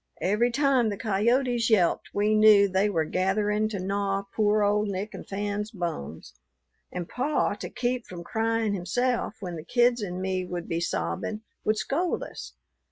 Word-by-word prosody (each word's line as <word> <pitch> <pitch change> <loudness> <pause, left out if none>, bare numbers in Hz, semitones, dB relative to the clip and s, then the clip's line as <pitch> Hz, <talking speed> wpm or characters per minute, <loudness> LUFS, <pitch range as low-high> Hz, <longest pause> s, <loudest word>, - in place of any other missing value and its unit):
Every 210 +6 +2
time 260 -2 +2
the 205 - -3
coyotes 235 +4 +1
yelped 190 -6 +2
we 210 +1 +1
knew 215 -2 +7
they 190 +2 +1
were 165 -5 0
gathering 210 +5 +1
to 210 - -4
gnaw 195 +1 -1
poor 210 -1 +3
old 210 +1 +2
Nick 200 +2 -4
and - - -9
Fan's 205 +1 -3
bones. 175 - -5 0.6
And 180 -2 -4
pa, 280 +5 0
to - - -7
keep 245 0 -2
from 175 -2 -8
crying 225 +2 0
himself 225 +6 -1
when 175 -3 -5
the 155 - -7
kids 240 +5 +2
and 180 -3 -4
me 185 0 -1
would 175 -1 -5
be 165 - -1
sobbin', 85 - -2 0.2
would 215 0 +2
scold 340 +10 -1
us. - - -9
210 Hz, 165 wpm, -27 LUFS, 185-225 Hz, 0.6 s, knew